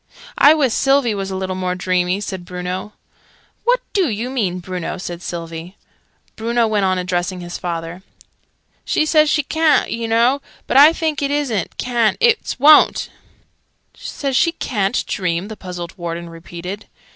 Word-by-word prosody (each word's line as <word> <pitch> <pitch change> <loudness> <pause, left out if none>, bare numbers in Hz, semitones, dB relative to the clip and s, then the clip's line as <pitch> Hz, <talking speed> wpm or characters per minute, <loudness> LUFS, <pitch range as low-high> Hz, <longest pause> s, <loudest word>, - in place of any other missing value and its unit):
"I 295 +2 +7
wiss 270 -7 +1
Sylvie 270 -4 +2
was 195 -1 -4
a 190 - -4
little 190 0 -3
more 185 -1 -2
dreamy," 185 +1 0
said 190 -3 -5
Bruno. 180 +3 -5 0.7
"What - - +3
do 380 -7 +2
you 230 +4 -3
mean, 200 -9 -1
Bruno?" 180 0 -5
said 175 -2 -6
Sylvie. 165 +1 -7 0.6
Bruno 235 +1 +1
went 210 -3 +1
on 185 0 +1
addressing 180 0 -2
his 175 0 -7
father. 170 0 -5 0.8
"She 310 - +1
says 310 -1 +4
she 300 -1 +2
ca'n't, 315 +1 +2
oo 230 0 -3
know. 235 +5 +2 0.2
But - - +1
I 295 +3 +9
thinks 315 -3 -2
it 280 - 0
isn't 280 -8 -2
ca'n't, 240 -3 +1
it's 465 - +1
wo'n't." 300 +3 +5 0.8
"Says 275 -2 -4
she 335 +5 +3
ca'n't 210 - -1
dream!" 180 0 -2
the 220 - -6
puzzled 180 -3 -7
Warden 170 0 -5
repeated. 175 +4 -8
200 Hz, 155 wpm, -19 LUFS, 180-270 Hz, 0.8 s, I